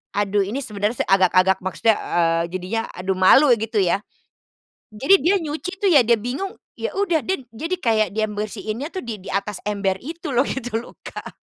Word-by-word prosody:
Aduh, 205 0 +1
ini 215 +8 -3
sebenarnya 210 +2 -2
agak-agak, 190 0 +4
maksudnya, 210 +3 +2
eee, 165 -1 +1
jadinya, 185 +5 -2
aduh 190 +1 -3
malu 190 +10 +6
gitu 225 -1 -1
ya. 190 0 +2 1.0
Jadi 275 - +5
dia 375 +4 +4
nyuci 315 +4 -4
tuh 405 -2 +2
ya, 285 -5 +7
dia 235 - +6
bingung, 280 - -4 0.2
ya 470 - -2
udah 365 -5 +1
dia 375 -8 -2
jadi 325 +10 -3
kayak 220 -6 +2
dia 220 0 +2
bersihinnya 215 +5 -4
tuh 375 - -5
di 225 -4 -6
di 185 - -13
atas 195 0 -2
ember 200 -2 0
itu 320 0 -6
loh 255 - +5
gitu 245 -3 -4
loh, 235 - -12
Kak. - - -8
220 Hz, 185 wpm, -22 LUFS, 195-285 Hz, 1.0 s, ya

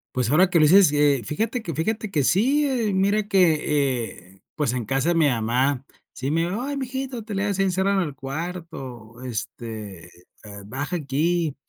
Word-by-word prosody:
Pues, 125 0 0
ahora 180 +4 +5
que 170 - +3
lo - - +5
dices, 185 +4 +7
sí, 145 0 0
eh, 145 -3 +3
fíjate 225 - -2
que 170 -6 -5
fíjate 215 +6 -2
que 150 -7 0
sí, 265 - +3
¿eh? 240 -6 0
Mira 200 +2 +1
que, 150 - +2
eh, 95 0 -15
pues, 145 -5 0
en 125 -3 -3
casa 135 +7 0
de 175 - +2
mi 160 -3 +4
mamá, 125 +3 0 0.3
sí 135 +3 -3
me 165 +2 +2
dijo: 185 +7 -2
"¡Ay, 280 +2 -3
mi 270 - -2
hijito, 255 -2 -5
te 210 -1 -6
le 195 - 0
has 200 -2 -1
encerrado 190 +1 +2
en 175 - -1
el 145 - -8
cuarto", 135 -6 -7
este, 110 -5 -6
eh, 90 - -20 0.4
"baja 135 - -4
aquí!". 155 +1 0
155 Hz, 200 wpm, -24 LUFS, 130-195 Hz, 0.4 s, dices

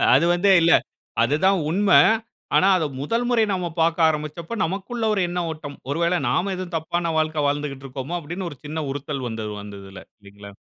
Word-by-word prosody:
அது 150 - +4
வந்து 190 +3 +2
இல்ல. 165 +1 +4 0.5
அது 135 +5 +2
தான் 195 -1 +4
உண்மை. 185 -4 +5 0.6
ஆனா, 190 - +5
அத 160 - 0 0.2
முதல் 230 +12 -1
முறை 230 -2 +3
நாம 180 -2 -1
பாக்க 165 +1 +2
ஆரம்பிச்சப்ப, 155 +6 -3
நமக்குள்ள 195 +7 -4
ஒரு 195 - +1
எண்ண 180 - -2
ஓட்டம். 150 -2 -8
ஒரு 145 +4 -1
வேள 175 +1 +2
நாம 190 +10 0
எதுவும் 180 -2 -5
தப்பான 170 +1 -2
வாழ்க்கை 155 -1 0
வாழ்ந்துக்கிட்டு 140 -2 -3
இருக்கோமோ! 135 +5 -5
அப்பிடின்னு 175 +4 -5
ஒரு 145 - -11
சின்ன 155 +1 -3
உறுத்தல் 140 -2 -4
வந்தது 110 -2 -5
அந்த 100 -1 -9
இதுல. 95 0 -11 0.2
இல்லீங்ளா? 100 0 -13
160 Hz, 185 wpm, -23 LUFS, 140-180 Hz, 0.6 s, உண்மை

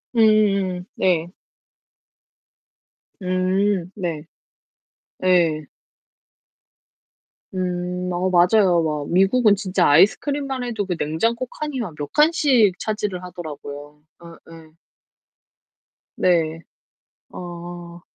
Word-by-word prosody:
음음 200 -5 +3
네. 175 -2 +1 1.9
음 185 0 0
네. 170 -6 -4 1.0
예. 170 -4 +3 1.9
음 180 0 -3
어 180 +1 0
맞아요. 180 0 +4
막 150 -2 -3
미국은 200 +4 +4
진짜 190 -3 +1
아이스크림만 265 - +2
해도 225 -4 -3
그 180 -2 -2
냉장고 230 +13 -1
칸이 295 0 -5
막 215 -9 -4
몇 145 -1 -6
칸씩 275 - +3
차지를 210 -4 -3
하더라고요. 150 -4 -9 0.2
아 170 -1 -13
예. 160 -1 -14 1.4
네. 165 -3 +1 0.7
어. 175 0 -9
180 Hz, 155 characters per minute, -21 LUFS, 170-210 Hz, 1.9 s, 맞아요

